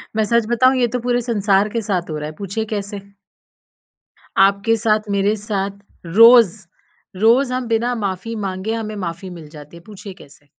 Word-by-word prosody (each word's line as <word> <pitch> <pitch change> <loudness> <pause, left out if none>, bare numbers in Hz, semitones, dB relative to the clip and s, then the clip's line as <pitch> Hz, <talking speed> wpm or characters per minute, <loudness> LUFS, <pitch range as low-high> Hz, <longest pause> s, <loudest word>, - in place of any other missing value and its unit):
मैं 220 - +2
सच 235 +1 +1
बताऊँ, 255 +2 +3
ये 245 -1 +2
तो 250 +2 -3
पूरे 245 0 0
संसार 210 -3 +1
के 230 +2 -3
साथ 185 -5 -3
हो 155 - -4
रहा 150 - -5
है, 155 - -12
पूछिए 200 +5 -4
कैसे? 205 -1 -5 1.4
आपके 200 +3 +3
साथ, 215 -1 +1
मेरे 200 +1 +1
साथ, 200 -2 -3 0.3
रोज़ 225 +2 +6 0.6
रोज़ 245 +4 +3
हम 255 -1 -3
बिना 230 +2 0
माफ़ी 205 +1 -4
माँगे, 190 +4 -4
हमें 215 -2 -4
माफ़ी 170 +3 -6
मिल 170 -4 -11
जाती 150 +1 -13
है। - - -14
पूछिए 205 -1 -10
कैसे? 145 -3 -18
210 Hz, 175 wpm, -19 LUFS, 190-230 Hz, 1.4 s, रोज़